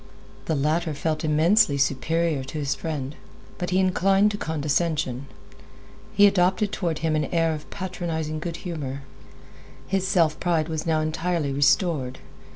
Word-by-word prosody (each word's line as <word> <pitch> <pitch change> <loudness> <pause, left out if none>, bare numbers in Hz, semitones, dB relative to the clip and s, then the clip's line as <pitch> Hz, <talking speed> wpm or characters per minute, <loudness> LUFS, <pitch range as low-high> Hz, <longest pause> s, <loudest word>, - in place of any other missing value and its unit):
The 160 - 0
latter 155 +2 0
felt 155 +2 -2
immensely 155 +2 +4
superior 145 +2 0
to 155 - -7
his 140 -2 0
friend, 150 -3 -4 0.4
but 180 - -2
he 185 - +1
inclined 195 +2 +3
to 205 - -4
condescension. 150 -5 -1 0.8
He 205 - +6
adopted 195 +1 +3
toward 170 -6 -2
him 155 -1 +1
an 150 -1 +1
air 165 +1 +1
of 150 -1 -8
patronizing 165 -5 -4
good 170 +1 -4
humor. 140 -6 -4 0.8
His 190 +2 -1
self 165 -5 +2
pride 165 -3 0
was 160 0 -3
now 160 -1 +2
entirely 155 -1 -1
restored. 140 -2 +2
160 Hz, 145 wpm, -25 LUFS, 150-180 Hz, 0.8 s, He